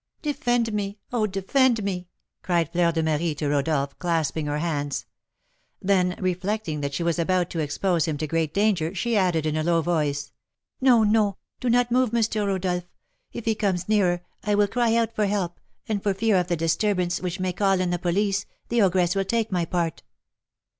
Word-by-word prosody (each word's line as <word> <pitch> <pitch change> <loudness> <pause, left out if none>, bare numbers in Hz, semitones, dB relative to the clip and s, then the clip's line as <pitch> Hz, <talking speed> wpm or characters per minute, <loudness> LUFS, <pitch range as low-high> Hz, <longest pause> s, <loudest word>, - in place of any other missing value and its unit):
"Defend 245 -6 0
me! 200 0 -2 0.2
oh, 220 -3 +2
defend 225 +4 +2
me!" 180 -3 -3 0.3
cried 170 -3 0
Fleur 170 -1 +2
de 165 -1 -1
Marie 160 0 0
to 145 0 -2
Rodolph, 140 -1 0
clasping 160 -3 -1
her 145 0 -1
hands. 145 -3 -2 0.7
Then, 185 -2 +2
reflecting 185 -3 -2
that 140 -1 -3
she 170 - -1
was 170 0 0
about 180 +1 +1
to 165 - -3
expose 160 +2 0
him 155 -2 -2
to 155 - -2
great 160 0 -1
danger, 195 -3 +1
she 235 +5 0
added, 180 -6 +2
in 155 0 0
a 155 - 0
low 165 0 +2
voice, 145 -4 -1 0.5
"No, 245 -4 +5
no, 210 -2 +2 0.2
do 250 - -1
not 245 0 +3
move, 250 -2 +2
Mister 220 -3 +1
Rodolph; 180 -2 -1 0.4
if 235 - -7
he 225 - +2
comes 190 -4 -1
nearer, 180 -5 +2 0.2
I 210 -1 +1
will 205 0 +3
cry 230 +1 +1
out 230 -1 +1
for 210 -1 +1
help, 190 -4 -2 0.3
and 210 -2 -1
for 200 -1 0
fear 215 0 +2
of 180 -1 +1
the 175 -1 0
disturbance, 175 +2 0
which 180 -1 -3
may 185 -1 -1
call 195 0 +2
in 180 -1 0
the 175 - -1
police, 200 +3 0 0.2
the 235 -1 +2
ogress 180 -2 +3
will 195 0 0
take 225 +1 0
my 175 -2 +1
part." 170 -2 -2
185 Hz, 195 wpm, -25 LUFS, 165-210 Hz, 0.7 s, No